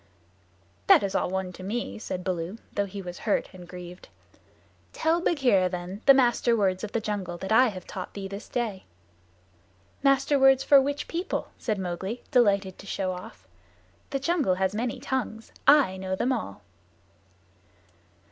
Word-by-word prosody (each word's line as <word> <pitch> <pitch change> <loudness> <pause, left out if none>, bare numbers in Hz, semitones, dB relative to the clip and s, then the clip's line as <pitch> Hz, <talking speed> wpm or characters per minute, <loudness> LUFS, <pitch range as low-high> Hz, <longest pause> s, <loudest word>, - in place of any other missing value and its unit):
"That - - +7
is 195 - -2
all - - 0
one 190 -1 -3
to 185 - -11
me," 215 +4 -4
said 180 -4 -5
Baloo, 180 +2 -3 0.2
though 200 0 0
he 200 0 -7
was 180 0 -7
hurt 215 - 0
and 180 -1 -11
grieved. 180 0 -10 0.8
"Tell 325 +2 +1
Bagheera, 245 - +3
then, 180 +3 -6
the 275 - +9
Master 240 -2 +3
Words 190 -2 +1
of 210 - -5
the 230 - +1
Jungle 200 -5 -4
that 190 +4 -6
I 250 +4 +6
have 185 -5 -6
taught 185 - -7
thee 195 -1 -5
this 200 +3 -8
day." 220 -6 -3 1.2
"Master 275 +1 +3
Words 270 0 +5
for 280 -2 +7
which 285 +2 -3
people?" 345 +3 -3
said 215 -3 -1
Mowgli, 190 +5 -4
delighted 200 -6 +2
to 200 - -11
show 190 -1 -2
off. 180 - -10 0.6
"The 275 - -1
jungle 285 - +1
has 190 +1 0
many 230 +2 -2
tongues. 225 -4 -4 0.2
I 275 -10 +6
know 190 0 -3
them 250 +7 0
all." 160 - -5
200 Hz, 165 wpm, -27 LUFS, 185-250 Hz, 1.2 s, the